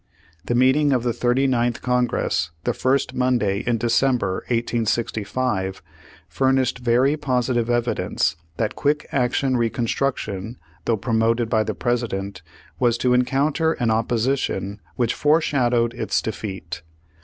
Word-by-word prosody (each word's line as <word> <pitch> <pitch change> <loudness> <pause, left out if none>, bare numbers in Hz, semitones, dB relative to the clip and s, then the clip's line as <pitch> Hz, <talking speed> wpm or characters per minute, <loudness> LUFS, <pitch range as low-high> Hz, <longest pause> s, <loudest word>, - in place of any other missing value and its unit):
The 120 - 0
meeting 135 +4 +4
of 125 -2 +1
the 120 -1 0
Thirty 125 +3 +1
ninth 120 -2 0
Congress 125 -8 0
the - - 0
first 130 +1 0
Monday 120 -6 +1
in 120 -1 +2
December, 115 -4 +1
1865, 115 -3 -1 0.4
furnished 130 -2 +1
very 125 +4 +3
positive 125 -4 0
evidence 120 -7 0 0.2
that 110 -2 -1
quick 145 +1 0
action 130 0 +1
Reconstruc 120 +3 0
tion, 105 +4 -6 0.3
though 115 - +1
promoted 115 +1 +1
by 110 - +3
the - - -3
President, 100 -6 -2 0.4
was 120 -2 +2
to 125 0 +2
encounter 140 +6 +2
an 120 -6 0
opposition 115 -3 -1
which 120 -1 +1
forshadowed 125 -6 +2
its - - -1
defeat. 95 -6 -5
120 Hz, 125 wpm, -22 LUFS, 115-130 Hz, 0.4 s, meeting